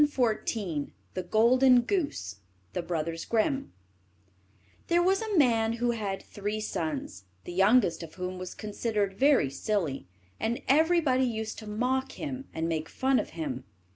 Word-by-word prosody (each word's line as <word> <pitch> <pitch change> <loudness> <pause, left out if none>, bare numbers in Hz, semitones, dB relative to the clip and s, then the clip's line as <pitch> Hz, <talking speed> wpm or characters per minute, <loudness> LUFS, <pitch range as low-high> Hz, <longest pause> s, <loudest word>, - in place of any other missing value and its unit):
CHAPTER 260 -6 +2 0.3
IX 160 -8 -3 0.2
THE - - -2
GOLDEN 245 +6 +5
GOOSE 235 - -2 0.4
There 170 -2 -1 2.0
was 385 +3 +3
a 435 -4 -1
man 230 -5 +4
who 240 +1 0
had 205 -4 -3
three 205 +1 -4
sons, 150 - -4 0.2
the 175 - -7
youngest 195 -2 +4
of 165 -2 -9
whom 185 0 -4
was 185 -1 -6
considered 210 -1 -2
very 270 - +4
silly, 155 - -2 0.3
and 235 +4 -1
everybody 300 -3 +4
used 220 -2 -3
to 215 - -9
mock 255 +5 0
him 275 -3 -5
and 160 +1 -2
make 160 -1 -2
fun 265 0 +2
of - - -3
him. 135 -6 -3
215 Hz, 140 wpm, -29 LUFS, 175-260 Hz, 2.0 s, GOLDEN